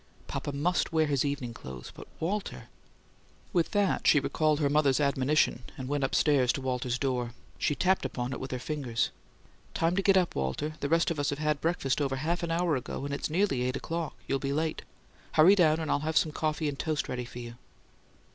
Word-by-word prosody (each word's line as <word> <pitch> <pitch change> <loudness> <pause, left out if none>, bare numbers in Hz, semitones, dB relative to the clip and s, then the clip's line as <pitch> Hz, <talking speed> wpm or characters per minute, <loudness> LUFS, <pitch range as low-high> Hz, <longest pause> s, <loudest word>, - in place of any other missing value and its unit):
Papa - - -4
MUST 160 +7 0
wear 160 -1 +3
his 140 -3 +1
evening 140 -4 -2
clothes. 65 - -9
But - - -11
Walter 195 +5 -3 0.4
" - - -31
With 170 -3 +2
that 205 -2 +1
she 150 - +7
recalled 155 +2 +1
her 145 - +2
mother's 140 -2 +3
admonition, 140 -2 +2 0.2
and 130 - -5
went 145 0 -1
upstairs 135 -2 +3
to 140 - -4
Walter's 125 -1 -1
door. 125 -3 -1 0.3
She 145 - +1
tapped 190 +4 +2
upon 125 +1 -3
it - - -5
with 130 - -5
her 130 - -2
fingers. 125 -3 -2 0.6
"Time 165 +2 +1
to 195 - +2
get 195 0 +4
up, 180 -2 +2
Walter. 70 - -2
The 140 - -2
rest 165 +1 +3
of 160 - -3
us 145 - +1
had 150 0 -1
breakfast 155 -5 0
over 135 -2 0
half 160 +6 -1
an 170 - -2
hour 165 -1 +1
ago, 130 +1 -4
and 140 - -3
it's 140 - -2
nearly 170 -5 +1
eight 125 +1 0
o'clock. 165 +3 -3
You'll 135 - 0
be 140 0 -2
late. 155 +1 -1 0.5
Hurry 165 +5 +7
down 160 -5 +4
and 160 - -2
I'll - - +2
have 155 +2 -1
some 155 - +3
coffee 155 +1 -1
and 140 -1 -4
toast 155 -3 -1
ready 125 -1 -3
for 120 - -11
you." 120 -1 -8
145 Hz, 215 wpm, -29 LUFS, 130-160 Hz, 0.6 s, she